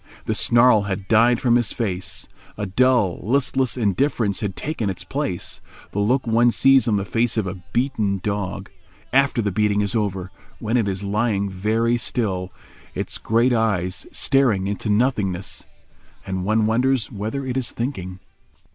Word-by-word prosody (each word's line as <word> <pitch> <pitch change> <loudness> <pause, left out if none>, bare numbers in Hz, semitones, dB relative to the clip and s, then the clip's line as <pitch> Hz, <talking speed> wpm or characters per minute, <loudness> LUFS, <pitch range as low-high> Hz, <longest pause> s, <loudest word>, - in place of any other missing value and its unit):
The - - 0
snarl 120 -3 +4
had 95 -1 -4
died 115 +2 +4
from 120 -2 +3
his 120 -4 0
face; 95 -6 -2 0.3
a 105 - -2
dull, 115 -2 +2
listless 130 +2 0
indifference 110 -1 +1
had 100 -3 -3
taken 135 -10 -3
its 95 - -5
place—the 105 - -5
look 125 +6 +1
one 115 +1 +4
sees 135 0 +4
on 110 - +2
the 100 -1 -1
face 115 +4 0
of 110 - +1
a 95 0 -5
beaten 110 -4 0
dog, 100 -3 -3 0.4
after 135 -3 +3
the 105 - 0
beating 105 +1 +1
is 100 -2 -1
over, 95 -4 -2 0.3
when 115 +1 -2
it 115 -4 +2
is 95 0 -3
lying 100 -1 0
very 110 +5 +1
still, 95 -6 -2 0.4
its - - -4
great 120 +3 +2
eyes 100 -6 -1
staring 125 -9 +2
into 100 +2 -3
nothingness, 105 -5 0 0.6
and 95 -1 -3
one 110 +1 +2
wonders 125 +2 +1
whether 110 +6 -4
it 125 -1 -3
is 130 -4 -1
thinking. 95 -8 -4
110 Hz, 155 wpm, -22 LUFS, 100-120 Hz, 0.6 s, snarl